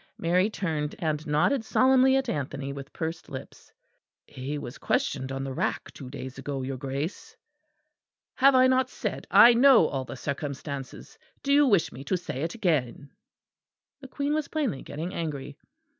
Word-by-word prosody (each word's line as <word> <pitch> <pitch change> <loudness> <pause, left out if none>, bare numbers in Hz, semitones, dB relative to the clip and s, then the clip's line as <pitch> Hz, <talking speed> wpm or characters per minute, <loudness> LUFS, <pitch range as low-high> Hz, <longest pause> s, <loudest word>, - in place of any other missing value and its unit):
(Mary 180 +4 +2
turned 155 -8 -3
and 155 -1 -2
nodded 180 - +2
solemnly 260 +3 +4
at 270 0 +1
Anthony, 140 -1 -3
with 140 0 -9
pursed 160 +1 -5
lips.) 130 -3 -10 0.5
"He 135 +3 -5
was 125 -3 -8
questioned 250 - -1
on 135 0 -3
the 135 -1 -4
rack - - -2
two 130 - -9
days 130 0 -8
ago, 135 0 -4
your 135 0 -4
Grace." 140 +6 -5 1.0
"Have 275 0 +5
I 255 0 +6
not 260 0 +3
said - - -5
I 240 - +8
know 245 - +6
all 135 -3 -2
the - - -7
circumstances? 140 -1 -6 0.2
Do 280 - +2
you 290 0 +6
wish 200 -8 +3
me 130 +3 -9
to 185 - 0
say 165 -6 -6
it 165 +5 -3
again?" 145 - -1 0.9
The 270 - -10
Queen 285 +2 -2
was 310 -1 -1
plainly 275 - -2
getting 165 +5 -6
angry. 145 -5 -4
155 Hz, 165 wpm, -27 LUFS, -, 1.0 s, I